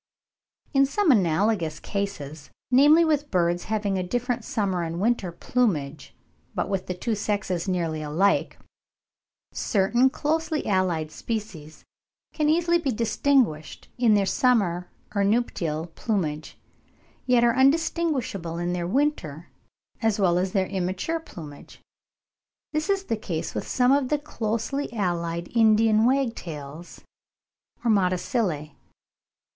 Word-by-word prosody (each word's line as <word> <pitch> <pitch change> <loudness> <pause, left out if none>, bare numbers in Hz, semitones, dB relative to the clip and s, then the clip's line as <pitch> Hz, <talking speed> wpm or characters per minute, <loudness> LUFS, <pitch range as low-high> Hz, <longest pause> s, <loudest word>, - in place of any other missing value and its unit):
In 275 -1 +4
some 385 +3 +2
analogous 180 - +1
cases, 155 -8 -5 0.2
namely 295 +6 +6
with 295 -2 0
birds 175 -1 +1
having 205 -3 -1
a - - -1
different 245 +5 -2
summer 195 -5 -1
and 165 0 -3
winter 210 -4 0
plumage, 160 - -2 0.4
but - - -1
with 195 -2 -2
the 180 - -3
two 225 +6 -2
sexes 200 -4 -2
nearly 165 -4 -1
alike, 165 +7 +1 0.9
certain 235 +6 +2
closely 315 +2 -1
allied 180 -6 0
species 200 -10 -6 0.5
can 300 -1 +1
easily 340 +2 +3
be 285 -5 -1
distinguished 230 - 0
in 230 -4 +4
their 200 -1 +2
summer 190 -6 +1 0.2
or 200 -1 +1
nuptial 175 -7 -1
plumage, 160 -9 -3 0.7
yet 245 -2 +4
are 235 -1 +4
indistinguishable 265 - +1
in 175 +1 -2
their 175 -1 -2
winter 185 - -1 0.5
as 225 -2 +1
well 180 -3 +3
as 185 - +1
in 185 - -12
their 190 -2 +2
immature 190 - -2
plumage. 155 - -12 0.9
This 310 +5 -1
is 395 -1 +1
the 225 - -2
case 170 -6 -4
with - - -4
some 250 0 +2
of 275 -2 +2
the 300 - +2
closely 275 0 -3
allied 170 -3 -2
Indian 220 -1 +4
wagtails 175 - -3 0.8
or 230 - +4
Motacillae. 180 - 0
205 Hz, 125 wpm, -25 LUFS, 175-250 Hz, 0.9 s, namely